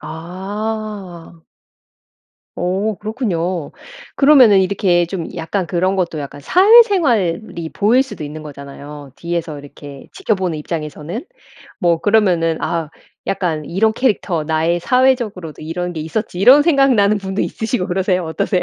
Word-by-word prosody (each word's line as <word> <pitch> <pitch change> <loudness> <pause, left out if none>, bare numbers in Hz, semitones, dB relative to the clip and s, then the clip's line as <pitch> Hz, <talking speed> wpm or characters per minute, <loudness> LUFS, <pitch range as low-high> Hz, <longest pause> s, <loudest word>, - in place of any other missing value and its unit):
아. 185 +1 -6 1.2
어 190 +5 -1
그렇군요. 185 - -3 0.5
그러면은 260 -9 +6
이렇게 185 -2 +2
좀 170 -2 -5
약간 170 +3 -2
그런 185 +2 0
것도 175 -4 -2
약간 145 0 -7
사회생활이 245 - +3
보일 235 +6 +3
수도 255 - -8
있는 155 +1 -8
거잖아요 140 -1 -10
뒤에서 170 -3 -4
이렇게 140 -1 -12
지켜보는 185 -6 -1
입장에서는. 155 - -5 0.6
뭐 170 -2 +2
그러면은 180 -7 +2
아 165 -3 -2 0.4
약간 165 -6 -2
'이런 220 +7 +1
캐릭터 200 -10 0
나의 160 +2 0
사회적으로도 235 - 0
이런 175 +3 -4
게 160 - -4
있었지.' 175 +4 -4
이런 255 +9 +7
생각나는 265 -10 +3
분도 195 0 -4
있으시고 220 -3 -2
그러세요? 185 -1 0
어떠세요? 180 +3 -1
180 Hz, 320 characters per minute, -18 LUFS, 160-215 Hz, 1.2 s, 이런